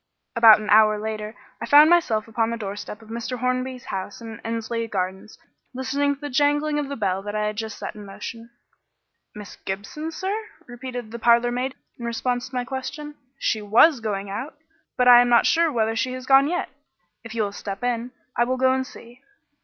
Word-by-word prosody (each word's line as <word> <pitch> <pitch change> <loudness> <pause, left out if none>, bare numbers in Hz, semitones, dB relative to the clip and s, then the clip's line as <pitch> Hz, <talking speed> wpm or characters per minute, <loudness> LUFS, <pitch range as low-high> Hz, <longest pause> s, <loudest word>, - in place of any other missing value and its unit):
About 230 -2 +8
an 215 - -6
hour 215 0 +6
later 215 0 -5 0.3
I - - -4
found 300 +3 +7
myself 230 -12 +2
upon 225 0 0
the 235 - -3
doorstep 205 +1 -7
of 220 - -17
Mr. 235 +2 -4
Hornby's 255 +1 -2
house 190 +1 -5
in 225 -1 -9
Endsley 230 0 -3
Gardens 190 +1 -4 0.4
listening 280 +2 0
to 280 - -27
the 290 - -4
jangling 295 +2 +2
of 285 -2 -3
the 280 - -4
bell 195 -4 -1
that 205 +1 -6
I 210 0 0
had 210 0 -2
just 220 0 -5
set - - -6
in 210 - -10
motion. 230 +4 -8 0.9
"Miss 210 -2 -10
Gibson, 200 +12 -5
sir?" 380 +5 -3 0.3
repeated 245 -2 -7
the 235 - -6
parlourmaid 240 +3 +2 0.2
in 235 - -6
response 245 +1 -2
to 260 - -10
my 250 -1 -1
question. 290 +3 -6 0.2
"She 220 -5 -1
was 235 +8 +5
going 205 -3 -3
out, 255 +11 -5 0.4
but 250 - +3
I 245 -1 +9
am 245 - +1
not 235 -1 +5
sure 335 -1 +3
whether 225 -2 0
she 255 +3 -1
has 255 0 -7
gone 270 +1 +6
yet. 355 +3 -2 0.5
If 230 0 -9
you 225 - +1
will 200 - -3
step 200 +2 -7
in, 245 0 -1 0.3
I 240 - +3
will 255 +1 -1
go 260 0 +3
and 260 0 -1
see." 240 +2 -14
235 Hz, 200 wpm, -23 LUFS, 215-260 Hz, 0.9 s, I